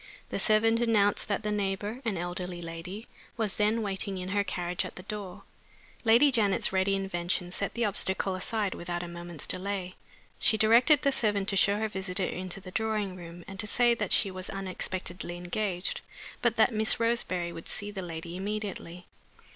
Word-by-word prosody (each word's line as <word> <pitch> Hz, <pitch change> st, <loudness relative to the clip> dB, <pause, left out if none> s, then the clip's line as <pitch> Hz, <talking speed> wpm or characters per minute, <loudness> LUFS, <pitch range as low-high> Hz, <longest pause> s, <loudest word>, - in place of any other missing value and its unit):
The -, -, -2 dB
servant 225 Hz, +1 st, +4 dB
announced 210 Hz, -4 st, +3 dB
that 210 Hz, +1 st, -1 dB
the 210 Hz, -, -1 dB
neighbor 205 Hz, +3 st, -2 dB
an 210 Hz, -5 st, 0 dB
elderly 175 Hz, +1 st, -4 dB
lady 175 Hz, +6 st, -6 dB, 0.3 s
was 215 Hz, -4 st, -1 dB
then 215 Hz, +2 st, +2 dB
waiting 195 Hz, -1 st, -1 dB
in 185 Hz, 0 st, -4 dB
her 200 Hz, +1 st, +2 dB
carriage 180 Hz, -2 st, -2 dB
at -, -, -7 dB
the 180 Hz, -, -8 dB
door. 200 Hz, -1 st, -6 dB, 0.6 s
Lady 240 Hz, +5 st, +6 dB
Janet's 205 Hz, -6 st, +3 dB
ready 190 Hz, +1 st, +3 dB
invention 180 Hz, -2 st, -1 dB
set 200 Hz, +2 st, -2 dB
the 235 Hz, -1 st, +1 dB
obstacle 190 Hz, -1 st, 0 dB
aside 200 Hz, +1 st, -1 dB
without 175 Hz, 0 st, -4 dB
a -, -, -5 dB
moment's 170 Hz, -2 st, -4 dB
delay. 185 Hz, -1 st, -3 dB, 0.5 s
She 220 Hz, -, +5 dB
directed 240 Hz, +7 st, +6 dB
the 280 Hz, -, +4 dB
servant 205 Hz, -6 st, +2 dB
to 195 Hz, -, +1 dB
show 200 Hz, +2 st, +4 dB
her 220 Hz, +1 st, 0 dB
visitor 190 Hz, -2 st, -2 dB
into 185 Hz, +1 st, -4 dB
the 185 Hz, -1 st, -10 dB
drawing 215 Hz, -3 st, -1 dB
room, 175 Hz, -1 st, -10 dB
and 195 Hz, 0 st, -9 dB
to 210 Hz, -, 0 dB
say 240 Hz, +2 st, +4 dB
that 210 Hz, -5 st, -2 dB
she 195 Hz, -, +4 dB
was 185 Hz, 0 st, -6 dB
unexpectedly 185 Hz, -2 st, -3 dB
engaged, 180 Hz, +1 st, -2 dB, 0.4 s
but 235 Hz, -2 st, +3 dB
that 225 Hz, +1 st, +4 dB
Miss 220 Hz, +1 st, +2 dB
Roseberry 205 Hz, -7 st, 0 dB
would 165 Hz, -, -8 dB
see 205 Hz, 0 st, -1 dB
the 195 Hz, -2 st, -5 dB
lady 170 Hz, -1 st, -6 dB
immediately. 195 Hz, -3 st, -4 dB
195 Hz, 180 wpm, -29 LUFS, 180-215 Hz, 0.6 s, Lady